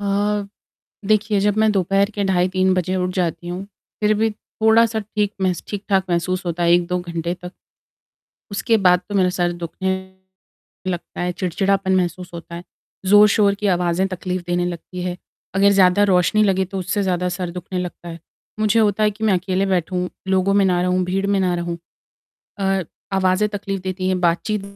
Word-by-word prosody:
अ, 205 0 0 0.6
देखिए 215 -1 +2
जब 205 +1 +1
मैं 220 - +4
दोपहर 195 +2 +1
के 200 -1 -1
ढाई 180 0 +2
3 185 0 +3
बजे 185 +1 -1
उठ 180 0 -1
जाती 175 -1 -2
हूँ, 180 +2 -4 0.4
फ़िर 210 0 +4
भी 220 +1 +1
थोड़ा-सा 220 +1 +2
ठीक 210 0 -2
महस 185 -2 0
ठीक-ठाक 195 -2 0
महसूस 185 +2 -1
होता 175 0 -2
है, 170 0 +4
1-2 175 +1 +2
घंटे 170 -1 -3
तक। 180 0 -10 1.0
उसके 220 +3 +1
बाद 180 0 +5
तो 205 - -6
मेरा 185 -2 +3
सर 175 -1 +1
दुखने 190 +3 -2 1.0
लगता 175 -2 -5
है, 180 0 -1
चिड़चिड़ापन 190 +1 0
महसूस 180 0 -2
होता 170 0 -8
है। 175 - -8 0.4
ज़ोर-शोर 205 0 +5
की - - +2
आवाज़ें 175 +1 0
तकलीफ़ 185 0 -4
देने 175 0 0
लगती 180 +1 -6
हैं, 180 0 -3 0.4
अगर 200 +1 +5
ज़्यादा 190 +2 +5
रोशनी 180 +4 +3
लगे 190 -2 +2
तो 195 - -2
उससे 200 +3 -1
ज़्यादा 180 -1 0
सर 180 -2 -3
दुखने 180 +1 -5
लगता 180 -1 -6
है, 165 0 -8 0.4
मुझे 215 +1 +3
होता 210 -1 +2
है 210 - +3
कि 215 +2 -6
मैं 210 -3 +3
अकेले 185 +1 0
बैठूँ, 180 -1 -1 0.2
लोगों 190 +1 +2
में 200 -1 +4
ना 180 -2 +2
रहूँ, 180 0 +1
भीड़ 195 +2 -1
में 200 -1 +1
ना 180 -2 +1
रहूँ। 170 0 -3 0.8
अ, 195 -1 +1 0.3
आवाज़ें 190 +2 +2
तकलीफ़ 195 -2 -4
देती 185 0 -2
हैं, 185 -1 0
बातचीत 180 +4 0
185 Hz, 180 wpm, -20 LUFS, 180-200 Hz, 1.0 s, बाद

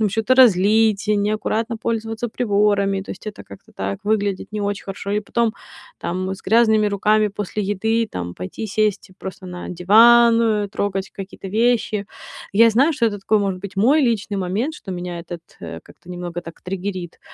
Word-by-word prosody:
там 215 - +3
чё-то 225 +5 +1
разлить, 215 -2 +4
неаккуратно 215 +2 0
пользоваться 225 +1 -3
приборами. 205 -3 +1
То 195 - -9
есть 195 - -9
это 210 - -7
как-то 100 - -15
так 100 +1 -4
выглядит 205 -1 -1
не 210 - -3
очень 200 0 -3
хорошо. 195 - -5 0.2
И 210 - +1
потом 230 +2 0 0.4
там 185 +2 -3
с - - -15
грязными 220 0 +4
руками 210 +1 +2
после 205 +1 -4
еды 220 +3 0
там 85 -1 -5
пойти 90 - -6
сесть 210 -2 -1
просто 190 0 -8
на 180 0 -7
диван, 225 +3 +5
трогать 195 -2 -3
какие-то 195 0 -8
вещи. 220 -1 +1 0.5
Я 230 +3 +6
знаю, 270 +9 +3
что 235 -5 +1
это 205 -2 -2
такой, 215 +2 +2
может 195 -2 -2
быть, 200 -1 -8
мой 260 +10 +4
личный 215 -4 0
момент, 200 - -2
что 195 - -9
меня 175 -1 -5
этот, 170 0 -8 0.2
э, - - -7
как-то 180 - -16
немного 175 -1 -5
так 165 0 -11
триггерит. 185 -2 -5
205 Hz, 175 wpm, -21 LUFS, 190-220 Hz, 0.5 s, Я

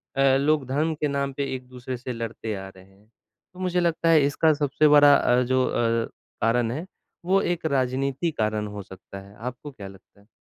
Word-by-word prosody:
अ, 135 -1 +4
लोग 145 0 +1
धर्म 150 +5 0
के 150 0 -1
नाम 140 -1 -2
पे 140 0 -3
एक-दूसरे 125 0 -7
से 125 +1 -6
लड़ते 115 -1 -5
आ 95 0 -7
रहे 95 -1 -17
हैं। 100 +2 -25 0.5
तो 180 - -14
मुझे 180 -1 0
लगता 170 -1 +1
है 160 -3 +6
इसका 155 +2 +3
सबसे 145 +1 +2
बड़ा 145 -1 +7
अ, 125 -2 +3
जो 130 +1 +1
अ, 115 -1 0 0.3
कारण 115 0 +2
है, 155 +8 -4 0.4
वो 190 +2 +3
एक 175 -3 -2
राजनीति 135 +2 0
कारण 110 -4 -1
हो 105 -1 -7
सकता 95 +1 -11
है। 100 +1 -15
आपको 125 +5 -7
क्या 105 -7 -10
लगता 95 +1 -17
है? 100 - -26
130 Hz, 200 wpm, -25 LUFS, 115-150 Hz, 0.5 s, बड़ा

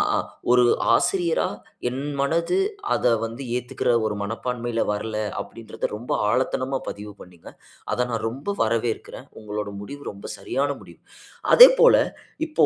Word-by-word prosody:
அ - - +2 0.4
ஒரு 125 -1 +6 0.3
ஆசிரியரா 175 0 +1 0.4
என் 135 +2 -4 0.2
மனது 170 - +1 0.4
அத - - -2 0.2
வந்து 115 +4 -6
ஏத்துக்கிற 125 0 -1 0.2
ஒரு 105 -1 -3
மனப்பான்மைல 120 +2 -3
வரல, 105 +1 -4 0.3
அப்டின்றத 115 -1 -7
ரொம்ப 120 - -7 0.2
ஆழத்தனமா 130 +2 0
பதிவு 105 0 -8
பண்ணீங்க. 90 -2 -13 0.4
அத 125 - +1
நான் 115 -1 -2
ரொம்ப 135 - -10 0.2
வரவேற்கிறேன். 115 0 -2
உங்களோட 105 -1 -4
முடிவு 145 +7 -8
ரொம்ப 100 0 -13
சரியான 140 +1 -1
முடிவு. - - -16 0.6
அதேபோல - - +9 0.5
இப்போ, 310 - +3
125 Hz, 130 wpm, -24 LUFS, 110-140 Hz, 0.6 s, அதேபோல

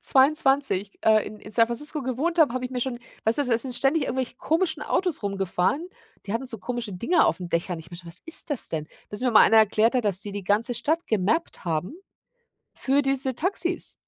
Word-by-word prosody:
22, 270 -7 +2
äh, 215 -1 +4
in 215 - -8
in 210 - -11
San 230 0 +4
Francisco 295 +6 -1
gewohnt 275 +7 -2
habe, 300 -7 +5
habe 255 0 -3
ich 250 - -4
mir 250 -1 -3
schon 245 -1 -2 0.3
weißt 220 +4 +1
du, 290 - +2
da 235 -2 +1
sind 250 +1 -4
ständig 275 +4 +1
irgendwelche 260 -2 -3
komischen 320 0 0
Autos 360 -8 -1
rumgefahren, 195 - -1 0.4
die 200 - -3
hatten 230 +4 -2
so 235 -3 -4
komische 235 +2 -4
Dinger 280 - +2
auf 165 - 0
'n 180 - -5
Dächern. 170 +1 -1
Ich 160 +1 -12
meinte: 175 0 -10
„Was 170 +1 -1
ist 325 -1 -2
das 285 - -1
denn?“ 155 -2 -3 0.2
Bis 210 - -5
mir 250 -1 +1
mal 220 - +7
einer 225 - +6
erklärt 220 +3 +3
hat, 245 - +1
dass 195 -3 +1
die 205 0 -4
die 200 -1 -5
ganze 215 +5 +1
Stadt 315 +8 -1
gemappt 220 - 0
haben 170 - -2 0.8
für 275 +2 +1
diese 270 -2 -1
Taxis. 355 +3 -1
240 Hz, 215 wpm, -25 LUFS, 205-280 Hz, 0.8 s, mal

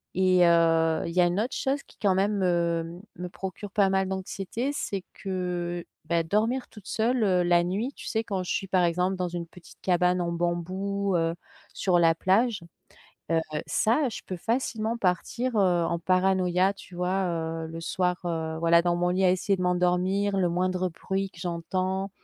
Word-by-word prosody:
et 185 -1 +4
heu, 165 -1 +3
il 170 - -5
y 180 - +4
a - - +5
une 175 +3 0
autre 240 +4 -1
chose 275 +1 -1
qui - - -22
quand 195 -3 +3
même 200 +2 +1
me 170 -2 0 0.2
me 180 0 -5
procure 190 +2 -7
pas 200 -2 +3
mal 190 0 +1
d'anxiété, 195 +7 -3
c'est 195 -8 -3
que, 180 -2 -3 0.2
bah, 170 0 +1
dormir 225 +9 0
toute 210 -3 -14
seule, 230 +1 +1
heu, 180 -3 +3
la 175 0 +4
nuit, 210 +10 -2
tu - - -9
sais, 220 0 0
quand 195 -4 -3
je - - -4
suis, 195 - -1
par 185 -2 +2
exemple, 180 +3 +1
dans 180 -1 -2
une 170 -1 -5
petite 180 +1 -16
cabane 180 0 +2
en 170 0 -1
bambou, 185 +3 -1
heu, 165 0 +1 0.4
sur 180 -3 +2
la 165 -1 +5
plage. 200 +4 +2 0.7
Heu, 165 0 +3 0.2
ça, 250 +6 +2
je - - -7
peux 185 - -5
facilement 230 +1 -1
partir, 230 +6 -1
heu, 180 -3 +3
en 170 0 -1
paranoïa, 185 +1 +2
tu 185 -2 -13
vois? 185 +2 0
Heu, 165 -1 -3
le 165 +1 -7
soir, 180 +1 0
heu, 160 -2 -2
voilà 170 0 +5
dans 175 -1 +2
mon 175 0 +1
lit 185 +2 +1
à 180 - +5
essayer 190 +1 +1
de 180 - -2
m'endormir, 180 +3 +1
le 180 -2 +2
moindre 185 +1 0
bruit 190 +3 -3
que 170 - -15
j'entends, 185 +3 -2
185 Hz, 190 wpm, -27 LUFS, 175-195 Hz, 0.7 s, a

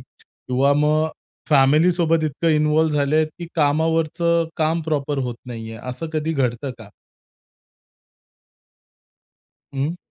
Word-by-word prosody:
किंवा 135 +3 -2
मग 150 +2 +2 0.4
फॅमिलीसोबत 160 +3 +3
इतकं 155 +3 -1
इन्व्हॉल्व 155 +1 +3
झाले 150 +2 +2
की 160 +3 -9
कामावरचं 165 +2 +1
काम 160 +1 +1
प्रॉपर 145 -2 -2
होत 120 -1 -3
नाहीये. 115 -2 -7
असं 125 +6 -5
कधी 155 +1 -1
घडतं 130 -2 -1
का? 110 -3 -12 2.9
हं. 145 +6 -2
155 Hz, 100 wpm, -21 LUFS, 140-160 Hz, 2.9 s, फॅमिलीसोबत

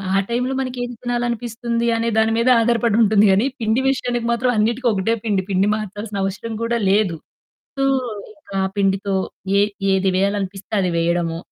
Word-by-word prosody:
ఆ - - +4
టైంలో 250 +3 -1
మనకి 255 -1 -3
ఏది 245 0 -5
తినాలనిపిస్తుంది 240 -1 -2
అనే 230 +1 -1
దాని 220 0 +3
మీద 235 +2 +2
ఆధారపడుంటుంది. 225 -3 +3
కానీ, 195 +5 +3
పిండి 225 +2 +1
విషయానికి 245 -3 -1
మాత్రం 250 +2 +1
అన్నిటికి 235 +4 +1
ఒకటే 200 +3 0
పిండి. 205 -4 +1
పిండి 195 +1 +2
మార్చాల్సిన 210 0 -5
అవసరం 205 +4 -4
కూడా 235 +1 0
లేదు. 195 -3 +2 0.6
సో, 275 - 0 0.5
ఇంకా 200 -1 -15
ఆ - - +1
పిండితో 195 0 0 0.4
ఏ - - +5 0.3
ఏది 190 0 +2
వేయాలనిపిస్తే 195 0 -2
అది 185 -2 0
వేయడము. 170 0 0
220 Hz, 155 wpm, -20 LUFS, 195-235 Hz, 0.6 s, ఏ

